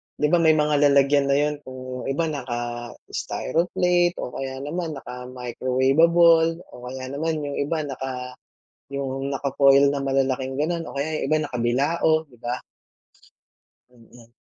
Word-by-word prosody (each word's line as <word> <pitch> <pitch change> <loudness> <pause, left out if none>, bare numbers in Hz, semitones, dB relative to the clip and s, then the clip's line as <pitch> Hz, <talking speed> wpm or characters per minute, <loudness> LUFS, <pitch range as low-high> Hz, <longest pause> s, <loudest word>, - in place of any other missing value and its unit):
'di 150 - +1
ba 175 - +5
may 160 -1 +5
mga 150 -1 +2
lalagyan 140 0 +4
na 140 - +3
yun 150 +1 +1
kung 130 0 -7
iba, 140 +5 0
naka-styroplate 145 +8 -1
o - - -5
kaya 135 0 -5
naman 160 +1 -3
naka-microwavable 135 +7 +2
o - - -19
kaya 130 0 -6
naman 155 +1 -2
yung 145 -1 -4
iba 155 +2 -1
naka 130 -2 -6 0.5
yung 135 0 -3
naka-foil 140 0 +4
na 140 - -2
malalaking 135 -1 0
ganun 165 +3 -1
o - - -9
kaya 155 +3 -2
yung - - -2
iba 155 - +3
nakabilao, 145 +6 +1
'di 125 -6 -22
ba? 120 +1 -3 1.3
Mm. 115 0 -18
140 Hz, 135 wpm, -24 LUFS, 130-155 Hz, 1.3 s, ba